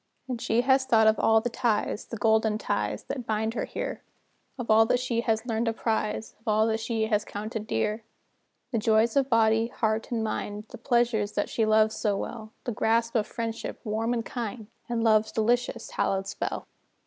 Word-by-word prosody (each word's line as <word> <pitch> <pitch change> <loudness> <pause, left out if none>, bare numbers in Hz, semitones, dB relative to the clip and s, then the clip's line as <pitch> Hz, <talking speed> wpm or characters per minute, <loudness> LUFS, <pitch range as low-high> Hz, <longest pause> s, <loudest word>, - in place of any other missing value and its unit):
And 245 -3 -4
she 225 +2 +2
has 265 +1 +4
thought 225 -4 +4
of 220 0 +4
all 225 0 +4
the 245 - -2
ties 230 -3 0
The 230 - -6
golden 220 -1 +2
ties - - -2
that 250 -4 -5
bind 220 +1 0
her - - -2
here; - - -5 0.6
Of 240 -3 -2
all 225 +1 +6
that 245 - +2
she 245 -2 -1
has 225 -1 0
learned 230 -1 -1
to 225 - +1
prize, 220 -1 -2
Of 220 - -30
all 215 0 +3
that 220 0 0
she 225 0 -1
has 210 -2 +1
counted 215 +1 -5
dear; 210 - -1 0.7
The 230 - +1
joys 220 +1 +3
of 275 -1 +2
body, 225 -1 +3
heart, 220 -2 -1
and 230 -2 0
mind, 210 -1 -3
The - - -10
pleasures 235 -4 +1
that 205 - -1
she 220 -2 0
loves 215 0 +4
so 205 -3 0
well; 220 0 -6
The 245 - -2
grasp 230 +1 +1
of 215 -3 +1
friendship, 230 -1 -4
warm 225 +1 -1
and 235 -1 -1
kind, 230 -2 -5 0.2
And 235 -1 0
love's 215 -1 +4
delicious, 240 +3 0
hallowed 195 0 0
spell. - - -4
225 Hz, 195 wpm, -27 LUFS, 215-235 Hz, 0.7 s, all